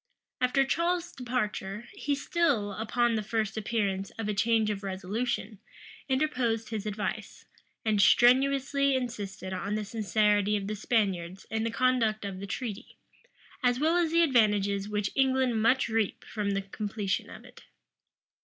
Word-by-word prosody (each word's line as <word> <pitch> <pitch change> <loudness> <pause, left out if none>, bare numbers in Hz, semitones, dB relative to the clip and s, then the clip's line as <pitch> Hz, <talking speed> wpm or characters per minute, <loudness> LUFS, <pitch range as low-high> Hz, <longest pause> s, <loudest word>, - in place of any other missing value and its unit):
After 255 +2 +3
Charles's 340 +4 0
departure, 235 -3 -3
he 285 0 -1
still, 285 -8 0
upon 230 +3 0
the 220 - 0
first 215 -1 -2
appearance 205 -3 -1
of 225 -2 -3
a 210 - 0
change 220 +1 +2
of 200 -1 -4
resolution, 200 +2 -3 0.5
interposed 250 -6 0
his 215 -2 -4
advice, 210 0 -4 0.4
and 215 -2 +3
strenuously 275 +4 +4
insisted 205 -7 -4
on 195 +3 -2
the 215 -1 -2
sincerity 210 -1 +2
of 200 - -4
the 215 +2 -3
Spaniards 195 -5 -1
in 220 0 0
the - - 0
conduct 230 -3 +1
of 195 -2 -5
the 200 - -6
treaty, 215 0 -6 0.6
as 245 0 +2
well 320 +3 +2
as 345 -2 +2
the 335 +1 +5
advantages 205 -7 +2
which 210 -1 -1
England 260 -4 +2
must 250 +4 +3
reap 225 -3 -1
from 205 -2 -2
the 195 - -1
completion 200 0 -3
of - - -11
it. - - -15
220 Hz, 150 wpm, -29 LUFS, 205-250 Hz, 0.6 s, the